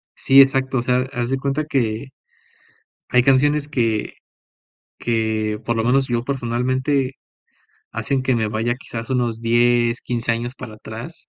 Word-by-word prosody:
Sí, 135 +1 +6
exacto, 135 -1 +3
o - - 0
sea, 125 0 +2
haz 120 -2 -2
de 135 - 0
cuenta 140 +3 -1
que, 120 -5 -1 1.0
hay 125 -1 +4
canciones 145 +3 +3
que 115 -7 -1 0.9
que 110 -2 -1
por 115 +1 -1
lo 110 - 0
menos 130 +3 +2
yo 120 -1 -1
personalmente, 130 +1 -1 0.8
hacen 135 -2 -1
que 130 0 +1
me 110 -2 0
vaya 110 +3 -1
quizás 115 -2 -7
unos 120 -3 -1
10, 120 +1 +2
15 120 -1 -1
años 120 +2 -3
para 110 - -9
atrás, 110 +9 -9
120 Hz, 150 wpm, -21 LUFS, 115-135 Hz, 1.0 s, Sí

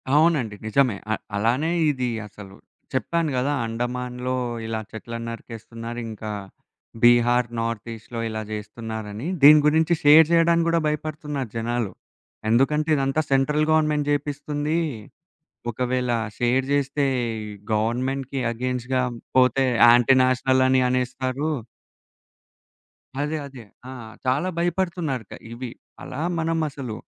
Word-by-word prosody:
అవునండి. 150 -9 +3
నిజమే. 120 -3 +2
అ - - +3 0.2
అలానే 120 +10 +1 0.2
ఇది 130 -3 -2 0.2
అసలు. 100 -2 -12 0.4
చెప్పాను 165 +4 0
గదా! 140 +3 +1
అండమాన్‌లో 125 +2 -3 0.3
ఇలా 110 0 -2
చెట్లన్నరికేస్తున్నారు. 115 +1 -7
ఇంకా 110 -1 -6 0.7
బీహార్ 120 0 +5
నార్త్ 115 -1 -3
ఈస్ట్‌లో 115 +1 -8
ఇలా 110 0 -4
చేస్తున్నారని. 110 +2 -6
దీని 150 +2 +9
గురించి 160 +2 +3
షేర్ 150 +2 +8
జేయడానికి 170 0 +4
గూడా 165 0 +3
భయపడుతున్నారు 150 -4 -3
జనాలు. 115 -2 -1 0.6
ఎందుకంటే 150 +6 +2
ఇదంతా 135 +2 +1
సెంట్రల్ 150 +3 +2
గవర్నమెంట్ 150 -2 +2
జేపిస్తుంది. 145 +2 -1 0.9
ఒకవేళ 125 +1 -1 0.3
షేర్ 125 +2 +1
జేస్తే 140 0 +1 0.7
గవర్నమెంట్‌కి 130 +5 -1
అగెయిన్స్ట్‌గా 125 +1 -1 0.3
పోతే 130 +1 +4 0.2
యాంటి 120 +2 +6
నేషనల్ 130 +1 +2
అని 130 0 +4
అనేస్తారు. 130 +3 -1 1.7
అదే. 150 +2 -1
అదే. 130 -4 -11 0.3
ఆ! - - -7 0.3
చాలా 135 +8 +1
భయపడుతున్నారు. 170 -7 -1
క - - -6 0.2
ఇవి 125 +1 -6 0.3
అలా 130 - -6 0.2
మనం 165 0 0
అసలు 135 -6 -6
130 Hz, 110 wpm, -24 LUFS, 115-150 Hz, 1.7 s, దీని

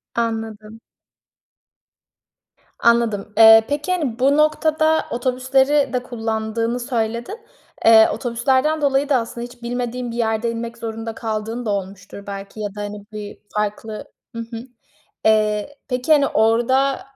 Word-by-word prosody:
Anladım. 225 -1 -3 2.0
Anladım. 230 -3 +2
Eee, 225 0 +8
peki, 295 +5 -2
hani, 290 -10 -1
bu 275 +3 +3
noktada 315 +1 +2
otobüsleri 260 +4 +1
de 250 -1 -1
kullandığını 225 0 -2
söyledin. 240 - -3 0.5
Eee, 225 -1 +8
otobüslerden 260 +6 0
dolayı 280 0 +1
da 280 - +4
aslında 235 0 -4
hiç 245 0 -14
bilmediğin 245 0 -3
bir - - -7
yerde 225 0 0
inmek 230 0 -6
zorunda 225 0 -5
kaldığın 225 +1 -4
da - - -2
olmuştur 200 0 -5
belki 200 +1 -8
ya 205 -1 -4
da 205 - -5
hani 205 0 -7
bir 210 -1 -8 0.2
farklı 210 +1 -3 0.3
Hı - - -4
hı. 230 0 -7 0.6
Eee, 215 +4 +2
peki, 250 +3 -2
hani, 285 -2 +4
orada 240 +5 +2
230 Hz, 130 wpm, -20 LUFS, 220-260 Hz, 2.0 s, Eee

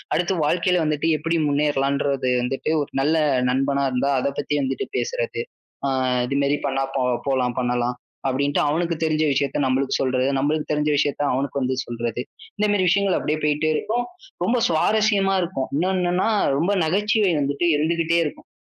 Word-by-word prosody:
அடுத்து 180 +2 0
வாழ்க்கையில 180 +2 +2
வந்துட்டு 155 +1 0
எப்படி 165 +3 -1
முன்னேறலாம்ன்றது 140 -2 0
வந்துட்டு 135 +4 -2
ஒரு 145 - -4
நல்ல 155 +3 +2 0.3
நண்பனா 140 +2 +1
இருந்தா 130 +3 0
அதைப் 140 +1 -2
பத்தி 145 +1 -1
வந்துட்டு 135 0 -2
பேசுறது. - - -2 0.4
ஆ, - - 0 0.4
இது 140 +1 -1
மாதிரி 145 +1 +1
பண்ணா 135 0 0
போ 130 - +1 0.2
போலாம், 125 -3 0
பண்ணலாம் 125 0 0 0.3
அப்படின்னு 140 +2 0
அவனுக்குத் 165 +1 -1
தெரிஞ்ச 155 0 +1
விஷயத்தை 140 0 0
நம்மளுக்கு 130 +1 0
சொல்றது, 130 0 +1
நம்மளுக்கு 150 +2 -1
தெரிஞ்ச 150 0 0
விஷயத்தை 145 0 0
அவனுக்கு 140 +1 -1
வந்து 130 0 0
சொல்றது. 120 0 -3 0.4
இந்த 210 0 +2
மாதிரி 185 -3 +2
விஷயங்கள் 200 -1 +2
அப்படியே 155 +1 -1
போயிட்டே 150 +1 +1
இருக்கும். 240 +2 -1 0.4
ரொம்ப 245 +2 +2
சுவாரஸ்யமா 195 +3 +2
இருக்கும். 135 -7 -3
இன்னொன்னுன்னா 180 +2 +1 0.3
ரொம்ப 180 +7 +1
நகைச்சுவை 205 +2 +2
வந்துட்டு 140 +5 0
இருந்துகிட்டே 165 +2 +1
இருக்கும். 150 - -7
150 Hz, 155 wpm, -22 LUFS, 135-175 Hz, 0.4 s, வாழ்க்கையில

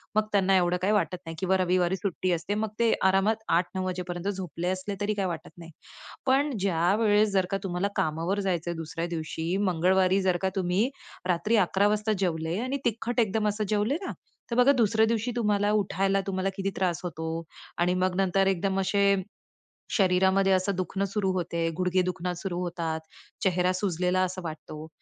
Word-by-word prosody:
मग 215 0 +3
त्यांना 195 -1 +3
एवढं 175 0 +2
काही 200 +3 +2
वाटत 205 -3 +1
नाही. 165 0 -6
किंवा 190 +1 +2
रविवारी 180 0 +2
सुट्टी 185 -1 -2
असते, 170 +5 -2
मग 215 0 -1
ते 230 -1 +4 0.2
आरामात 210 +4 +2
8:00-9:00 185 +1 -2
वाजेपर्यंत 180 0 -4
झोपले 180 -3 -5
असले 185 +2 -3
तरी 205 +1 +1
काही 200 -2 -1
वाटत 165 -3 -6
नाही. 165 -1 -11 0.5
पण 275 +3 +3
ज्यावेळेस 205 +4 +3
जर 190 -2 +2
का 195 - +1
तुम्हाला 185 +1 -1
कामावर 165 +6 0
जायचं 175 -2 -1
आहे 170 - -5
दुसऱ्या 165 +1 -4
दिवशी, 160 +2 -3 0.2
मंगळवारी 185 +3 +3
जर 185 -2 +2
का 190 - +1
तुम्ही 190 +5 +1 0.4
रात्री 180 +5 +1
11:00 195 +3 +2
वाजता 215 +1 +1
जेवले 165 -1 -1
आणि 255 +2 -2
तिखट 235 +2 -1
एकदम 215 -1 +1
असं 210 +1 -2
जेवले 215 +6 +1
ना, - - -3 0.4
तर - - 0
बघा 250 +3 +6
दुसऱ्या 220 -1 +3
दिवशी 230 +1 0
तुम्हाला 210 -3 +1
उठायला 195 -1 +1
तुम्हाला 190 0 -1
किती 195 0 -1
त्रास 180 -3 0
होतो 160 -2 -4 0.5
आणि 175 +1 +2
मग 185 0 0
नंतर 195 +1 +2
एकदम 195 +1 0
असे 200 +1 +3 0.8
शरीरामध्ये 190 0 +3
असं 190 +1 +2
दुखणं 185 +2 -2
सुरू 195 -1 -1
होते. 170 -2 -1
गुडघे 185 0 +2
दुखणं 180 0 -2
सुरू 175 -1 -4
होतात. 165 -2 -3 0.4
चेहरा 180 -1 +2
सुजलेला 185 -1 0
असा 185 0 -2
वाटतो. 155 -1 -7
190 Hz, 175 wpm, -27 LUFS, 175-205 Hz, 0.8 s, बघा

